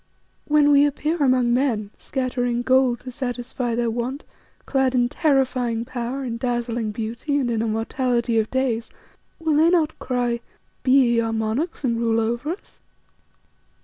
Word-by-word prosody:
When 295 -1 +4
we 285 0 +6
appear 300 +3 -1
among 255 -5 +3
men, 235 -6 0
scattering 245 -2 -2
gold 255 -1 +3
to 255 - -8
satisfy 245 -1 -3
their 235 -1 0
want, 245 +5 -3 0.4
clad 265 -2 +1
in 245 -1 +3
terrifying 255 -6 +1
power, 250 +2 -4
in 235 -3 -3
dazzling 240 -2 -2
beauty 230 +7 -2
and 255 -4 0
in 225 -1 0
immortality 230 +1 0
of 220 - -1
days, 255 -3 -1 0.5
will 320 -3 +1
they 320 +2 +5
not 325 -3 +1
cry, 245 -2 -1 0.4
'Be 260 - -2
ye 245 -3 +5
our 225 -1 0
monarchs 225 +10 -2
and 235 -3 0
rule 230 -1 +2
over 235 +6 -1
us! 385 - -16
245 Hz, 150 wpm, -23 LUFS, 235-270 Hz, 0.5 s, we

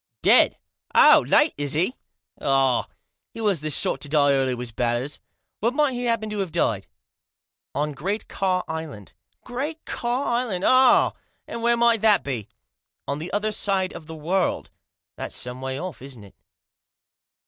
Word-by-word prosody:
" - - -62
Dead? - - +5 0.4
Oh! - - +7
Late, 300 - +4
is 145 -1 0
he? 175 +10 +1 0.5
Ah! 135 -2 +2 0.5
He - - -7
was 205 -8 +1
the 155 - -3
sort 135 -2 +1
to 145 - -5
die 145 -1 +3
early, 135 -2 +1
was 120 -1 -6
Batters. 120 +4 -2 0.4
Where 230 +3 +1
might 290 0 +1
he 245 0 -3
happen 230 -2 0
to 210 - -3
have 190 -4 -2
died? 115 - 0 0.3
" - - -69
" - - -69
On 150 +1 -1
Great 195 +9 -4
Ka 185 -2 -1
Island." 160 - -7 0.2
" - - -45
Great 285 +6 -5
Ka 245 +3 -1
Island? 210 -7 -2
Ah! 255 0 +5 0.3
And 230 - -6
where 235 0 +2
might 235 -2 +3
that 215 -2 +4
be?" 120 -7 -4 0.3
" - - -64
On 140 +1 -2
the 170 +4 -6
other 210 +1 -1
side 195 -3 0
of 155 - -10
the 160 - -8
world." 175 +5 -1 0.2
" - - -68
That's - - -6
some 125 +1 -6
way 130 0 -4
off, 180 -6 -7
isn't 130 -5 -10
it 100 - -16
175 Hz, 185 wpm, -24 LUFS, 135-225 Hz, 0.5 s, Oh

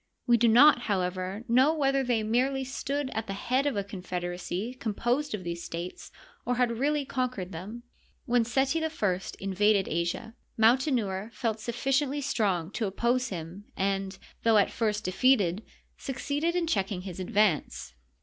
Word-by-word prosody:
We 240 - +5
do 235 0 +4
not, 250 +5 +7
however, 185 +2 -1
know 260 +7 +4
whether 275 -2 +2
they 240 -3 +1
merely 260 +5 +1
stood 275 +1 -3
at 220 0 -3
the 195 - -3
head 255 +7 0
of 270 -7 -1
a 200 - 0
confederacy 180 +2 -4
composed 245 +4 -1
of 190 - -8
these 170 0 -4
states, 170 +2 -6 0.3
or 250 - 0
had 235 -2 +1
really 290 +1 +1
conquered 250 -9 -3
them. 205 +8 -7 0.4
When 240 -1 +3
Seti 270 +7 +1
I 320 - 0 0.5
invaded 195 +1 +2
Asia. 170 +7 -2 0.2
Mautenouer 225 -4 +2
felt 220 0 -2
sufficiently 270 +5 0
strong 200 - 0
to 220 -1 -2
oppose 240 +5 0
him, 180 +2 -7
and, 195 0 -1 0.2
though 225 -1 +4
at 205 - +3
first 215 -2 -1
defeated, 200 -2 +2 0.4
succeeded 290 +5 -2
in 350 -1 +1
checking 195 - -1
his 185 -1 -7
advance. 185 - 0
225 Hz, 150 wpm, -28 LUFS, 190-260 Hz, 0.5 s, not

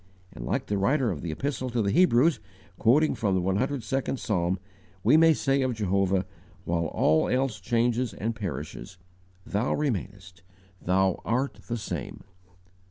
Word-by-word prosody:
And, - - -7
like - - -1
the 100 -1 -1
writer 130 +3 +2
of 75 -6 -5
the 85 - -4
Epistle 130 - -3
to 120 -1 0
the 100 - +1
Hebrews, 160 - +4 0.4
quoting 145 +8 +4
from 100 -4 0
the 95 - +1
102nd 130 +7 -1
Psalm, 90 -5 0 0.5
we 120 +8 +5
may 165 +1 +7
say 135 -2 +1
of 130 -2 0
Jehovah, 95 -2 +1 0.4
while 85 0 0
all 80 +1 +2
else 130 -4 0
changes 120 +3 0
and 110 +3 -3
perishes: 90 - -6 0.5
"THOU 105 +5 0
REMAINEST"; 100 - -4 0.4
"THOU 95 +1 +1
ART 130 +4 -1
THE 120 - -2
SAME." 90 - -6
110 Hz, 150 wpm, -27 LUFS, 95-130 Hz, 0.5 s, may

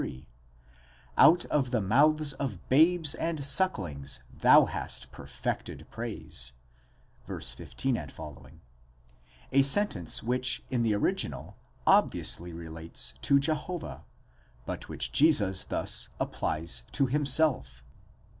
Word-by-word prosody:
(Out 175 +2 +5
of 135 -4 -1
the 120 -2 0
mouth 145 +8 +2
of 110 -11 -5
babes 160 +2 +3
and 160 -4 -3
sucklings 95 - 0
thou - - +5
hast - - -5
perfected - - -6
praise) 65 0 -5 0.7
{v. - - -6
15 65 - -3
f.); 75 -3 -10 1.3
a 135 - +4
sentence 135 - 0
which 125 +1 0
in 125 -2 0
the 110 -2 +1
original 100 - -2 0.3
obviously 85 +1 +2
relates 80 -6 -6
to 140 - +3
Jehovah, 155 +4 -4 0.6
but - - -7
which - - -2
Jesus 105 -12 +4
thus - - +2
applies 75 -6 0
to 140 - +2
himself. 140 - +2
130 Hz, 105 wpm, -28 LUFS, -, 1.3 s, Out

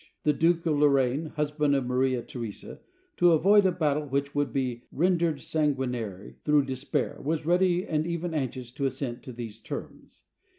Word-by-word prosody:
The 150 - +3
Duke 165 +3 +2
of 150 -3 +1
Lor 150 0 +6
raine, 135 +3 +1
husband 150 -1 +1
of 135 -2 0
Maria 125 0 +1
Theresa, 115 -5 -7 0.4
to 175 -1 +5
avoid 195 +5 +5
a - - +2
battle 150 -4 0
which 140 +1 -1
would 145 -1 0
be 125 -3 -2
rendered 170 -2 +1
sanguinary 125 - -2
through 150 -2 +3
despair, 135 +1 -2
was 155 +2 -1
ready 180 +2 +2
and 155 -3 -1
even 170 0 -3
anxious 130 -4 -3
to 135 +1 -1
assent 130 -2 -4
to 130 - -9
these 115 -3 -7
terms. - - -8
145 Hz, 170 wpm, -27 LUFS, 130-160 Hz, 0.4 s, Lor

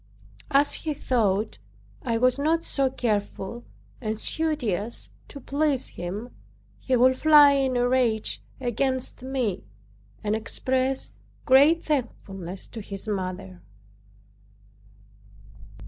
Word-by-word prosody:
As 280 +1 +4
he 310 -2 -2
thought 215 - 0 0.4
I 230 - -1
was 255 +3 +2
not 325 +3 +1
so 275 -2 +1
careful 220 -2 -3 0.4
and 215 -2 -2
studious 235 - -2 0.2
to 280 - -10
please 280 0 0
him 195 +7 -6 0.5
he 260 - 0
would 255 +2 +5
fly 300 -2 +8
in 270 -2 +1
a 245 0 +2
rage 245 -4 +1 0.2
against 260 +1 -1
me 255 - -2 0.6
and 210 0 0
express 260 +4 -1 0.3
great 285 +6 +5
thankfulness 195 - -3
to 225 - -7
his 200 0 -7
mother. 185 -2 -4
250 Hz, 105 wpm, -25 LUFS, 210-275 Hz, 0.6 s, fly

